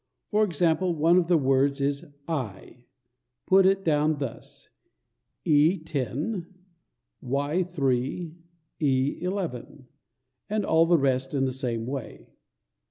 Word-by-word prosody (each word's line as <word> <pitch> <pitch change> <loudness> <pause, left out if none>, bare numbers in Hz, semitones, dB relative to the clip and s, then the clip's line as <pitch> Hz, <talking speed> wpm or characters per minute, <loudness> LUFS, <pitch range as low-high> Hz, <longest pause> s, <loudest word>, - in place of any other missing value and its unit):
For 215 0 +3
example, 175 -1 +1
one 165 +3 +4
of 170 - -1
the 175 -1 +4
words 135 0 +2
is 140 +1 -1 0.2
"EYE." 125 - -5 0.6
Put 190 0 +5
it 195 0 +2
down 155 -1 +2
thus: 135 -5 -8 0.8
E 155 +3 +4
Y 155 - -5
E 185 - +3
10 - - -10
3 140 +1 -1 0.9
11 170 -8 -4 0.6
and 210 -1 -1
all 165 +1 +4
the 170 0 +5
rest 135 -1 0
in 135 -1 +1
the 130 - -1
same 120 -3 -3
way. 125 -5 -7
150 Hz, 120 wpm, -26 LUFS, 135-175 Hz, 0.9 s, Put